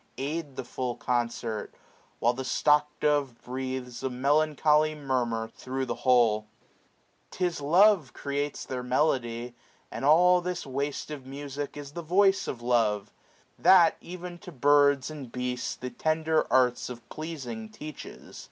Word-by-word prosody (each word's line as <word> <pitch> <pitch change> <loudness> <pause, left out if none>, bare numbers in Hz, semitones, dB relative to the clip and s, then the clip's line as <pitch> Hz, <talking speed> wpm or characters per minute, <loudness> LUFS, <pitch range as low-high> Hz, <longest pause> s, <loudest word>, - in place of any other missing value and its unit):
Aid 145 0 -4
the - - -4
full 125 -2 -3
concert: 120 -3 -2 0.4
While 120 +1 +2
the 130 +2 -5
stock 150 +3 +3
dove 145 -5 +1
breathes 130 -1 -5
A 135 - -1
melancholy 150 +3 +2
murmur 125 -6 -1
thro* 130 +3 -4
the - - -2
whole. 115 -4 +3 0.8
610 180 - 0
•Tis 170 -4 -5
love 185 - +5
creates 145 0 -3
their 130 -1 -4
melody, 125 -2 0 0.4
and - - -6
all 180 +5 +5
This 180 -1 -4
waste 140 +3 -3
of 140 -4 -7
music 140 +1 -6
is 145 -1 -8
the 170 - -6
voice 195 +4 +3
of 120 -2 -5
love; 110 -4 +1 0.5
That 175 -4 +6
ev'n 175 0 -8
to 180 -1 -10
birds, 145 0 +3
and 140 -6 -8
beasts, 125 0 -3
the 125 0 -6
tender 160 0 +1
arts 125 -1 +3
Of 120 -2 -9
pleasing 130 -9 -6
teaches. 150 +7 -10
140 Hz, 145 wpm, -28 LUFS, 125-155 Hz, 0.8 s, That